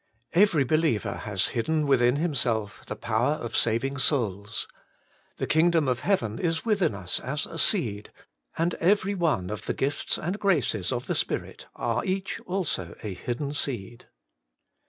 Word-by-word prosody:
Every 175 Hz, -5 st, +5 dB
believer 155 Hz, -4 st, +1 dB
has 95 Hz, -4 st, 0 dB
hidden 150 Hz, +6 st, 0 dB
within 125 Hz, -2 st, +4 dB
himself 125 Hz, -10 st, 0 dB
the -, -, -4 dB
power 115 Hz, +5 st, +1 dB
of 120 Hz, -7 st, -5 dB
saving 135 Hz, +5 st, +1 dB
souls. 105 Hz, -7 st, 0 dB, 0.7 s
The -, -, -1 dB
Kingdom 160 Hz, -1 st, +3 dB
of 125 Hz, -1 st, +1 dB
Heaven 115 Hz, -, 0 dB
is 165 Hz, +1 st, -1 dB
within 200 Hz, -, +2 dB
us 95 Hz, -2 st, -1 dB
as 145 Hz, +3 st, -3 dB
a -, -, -7 dB
seed, 110 Hz, -, +2 dB, 0.5 s
and 170 Hz, +1 st, +1 dB
every 200 Hz, +2 st, +3 dB
one 155 Hz, -, 0 dB
of 105 Hz, -, -6 dB
the -, -, -1 dB
gifts 140 Hz, +2 st, 0 dB
and 180 Hz, +6 st, -3 dB
graces 135 Hz, -, +1 dB
of 125 Hz, -1 st, -2 dB
the -, -, -1 dB
spirit -, -, -2 dB
are -, -, -1 dB
each 190 Hz, +1 st, -2 dB
also 170 Hz, -, -2 dB
a 105 Hz, -3 st, -3 dB
hidden 125 Hz, +9 st, -4 dB
seed. 120 Hz, -6 st, -4 dB
135 Hz, 155 wpm, -27 LUFS, 110-165 Hz, 0.7 s, Every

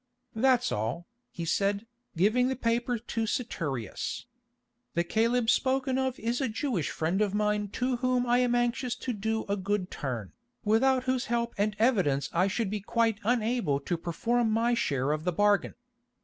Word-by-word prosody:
"That's 250 Hz, +1 st, +3 dB
all," 110 Hz, +12 st, -2 dB, 0.2 s
he 170 Hz, -, -6 dB
said, 200 Hz, +5 st, 0 dB, 0.3 s
giving 215 Hz, +8 st, +3 dB
the 265 Hz, -, -1 dB
paper 240 Hz, 0 st, 0 dB
to 225 Hz, 0 st, -3 dB
Saturius. 145 Hz, -, -3 dB, 0.7 s
"The 170 Hz, -, +2 dB
Caleb 230 Hz, +5 st, +1 dB
spoken 265 Hz, 0 st, +1 dB
of 260 Hz, -1 st, -1 dB
is 235 Hz, +4 st, -1 dB
a 265 Hz, -, 0 dB
Jewish 220 Hz, -, -1 dB
friend 170 Hz, +6 st, -1 dB
of 205 Hz, -1 st, +1 dB
mine 210 Hz, 0 st, +1 dB
to 250 Hz, 0 st, 0 dB
whom 250 Hz, 0 st, +1 dB
I 245 Hz, 0 st, +3 dB
am 245 Hz, -1 st, +2 dB
anxious 240 Hz, +1 st, 0 dB
to 255 Hz, -, -4 dB
do 220 Hz, +1 st, -2 dB
a 200 Hz, -, 0 dB
good 200 Hz, -1 st, -2 dB
turn, 120 Hz, -8 st, -4 dB, 0.3 s
without 255 Hz, +5 st, +3 dB
whose 255 Hz, -1 st, 0 dB
help 235 Hz, 0 st, -1 dB
and 210 Hz, +1 st, 0 dB
evidence 180 Hz, -, +2 dB
I 180 Hz, +3 st, +3 dB
should 205 Hz, 0 st, -1 dB
be 210 Hz, -1 st, -2 dB
quite 225 Hz, 0 st, +1 dB
unable 230 Hz, -, +1 dB
to 175 Hz, -, -1 dB
perform 225 Hz, +8 st, 0 dB
my 230 Hz, +2 st, +2 dB
share 140 Hz, -, 0 dB
of 155 Hz, 0 st, -1 dB
the 180 Hz, -, +1 dB
bargain. 205 Hz, +3 st, +2 dB
220 Hz, 170 wpm, -29 LUFS, 190-245 Hz, 0.7 s, That's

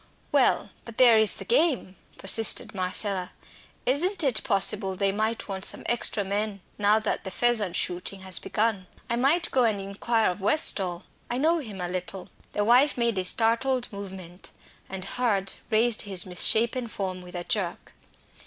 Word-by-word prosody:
"Well, -, -, +2 dB
but 230 Hz, -2 st, -12 dB
there 235 Hz, -3 st, +6 dB
is 220 Hz, -1 st, +3 dB
the -, -, -9 dB
game," 320 Hz, -, +1 dB, 0.2 s
persisted 220 Hz, +2 st, +2 dB
Marcella. 185 Hz, 0 st, -1 dB, 0.5 s
"Isn't 340 Hz, +8 st, +1 dB
it 255 Hz, -6 st, +1 dB
possible 195 Hz, -1 st, +2 dB
they 195 Hz, +1 st, 0 dB
might 220 Hz, +3 st, -2 dB
want 190 Hz, -2 st, -6 dB
some -, -, 0 dB
extra 230 Hz, -3 st, +1 dB
men 200 Hz, 0 st, -3 dB, 0.2 s
now 205 Hz, +1 st, +3 dB
the 220 Hz, -1 st, -2 dB
pheasant 220 Hz, -3 st, +1 dB
shooting 180 Hz, +2 st, -2 dB
has 190 Hz, -2 st, 0 dB
begun. 210 Hz, -4 st, -2 dB, 0.2 s
I -, -, +1 dB
might 290 Hz, +8 st, +1 dB
go 255 Hz, -, +2 dB
and 220 Hz, -3 st, +1 dB
inquire 200 Hz, +2 st, -1 dB
of 180 Hz, -, -9 dB
Westall 190 Hz, -, +3 dB, 0.3 s
I 240 Hz, -, -2 dB
know 325 Hz, +5 st, +1 dB
him 215 Hz, -9 st, -8 dB
a 180 Hz, -, -3 dB
little." 180 Hz, +1 st, -6 dB, 0.2 s
The 205 Hz, -, -1 dB
wife 255 Hz, +6 st, +3 dB
made 235 Hz, -4 st, 0 dB
a -, -, -1 dB
startled 235 Hz, +5 st, 0 dB
movement, 190 Hz, -3 st, -9 dB, 0.4 s
and 190 Hz, -1 st, -6 dB
Hurd 200 Hz, -4 st, 0 dB, 0.2 s
raised 225 Hz, 0 st, +2 dB
his 190 Hz, -3 st, +2 dB
misshapen 230 Hz, +7 st, +2 dB
form 190 Hz, -4 st, -5 dB
with 180 Hz, 0 st, -12 dB
a 175 Hz, -, -4 dB
jerk. 180 Hz, -2 st, -2 dB
210 Hz, 165 wpm, -25 LUFS, 190-235 Hz, 0.5 s, there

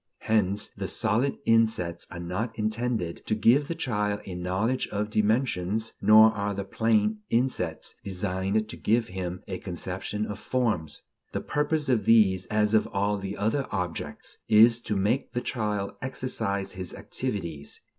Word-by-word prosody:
Hence 105 Hz, -2 st, +1 dB
the -, -, -4 dB
solid 125 Hz, +6 st, 0 dB
insets 110 Hz, -7 st, +2 dB
are 85 Hz, -, -7 dB
not 95 Hz, +7 st, -3 dB
intended 110 Hz, -5 st, -1 dB
to 110 Hz, -, +1 dB
give 125 Hz, +7 st, +4 dB
the 170 Hz, -, -3 dB
child 105 Hz, -9 st, -1 dB
a 95 Hz, -, -6 dB
knowledge 95 Hz, +8 st, -1 dB
of 105 Hz, +1 st, -3 dB
dimensions, 110 Hz, -1 st, +1 dB
nor 110 Hz, +2 st, +8 dB
are 100 Hz, -2 st, -2 dB
the 100 Hz, -, -3 dB
plane 110 Hz, +1 st, +1 dB
insets 125 Hz, +3 st, 0 dB
designed 95 Hz, +2 st, -1 dB
to -, -, -6 dB
give 115 Hz, +1 st, +1 dB
him 90 Hz, 0 st, -5 dB
a 95 Hz, -2 st, -4 dB
conception 95 Hz, +3 st, -4 dB
of 105 Hz, 0 st, -6 dB
forms; 110 Hz, -, -1 dB, 0.3 s
the -, -, -1 dB
purpose 150 Hz, +1 st, 0 dB
of 120 Hz, -6 st, +2 dB
these, 95 Hz, -5 st, +4 dB
as 105 Hz, 0 st, +1 dB
of 110 Hz, -, +4 dB
all 100 Hz, +1 st, 0 dB
the 95 Hz, +1 st, -5 dB
other 115 Hz, +7 st, 0 dB
objects, 90 Hz, -3 st, -4 dB
is 115 Hz, +2 st, +7 dB
to 110 Hz, -3 st, -3 dB
make 105 Hz, +7 st, 0 dB
the 120 Hz, -, 0 dB
child 105 Hz, -6 st, -2 dB
exercise 115 Hz, -7 st, -2 dB
his 95 Hz, -2 st, -5 dB
activities. 85 Hz, -, -4 dB
105 Hz, 155 wpm, -27 LUFS, 95-115 Hz, 0.3 s, nor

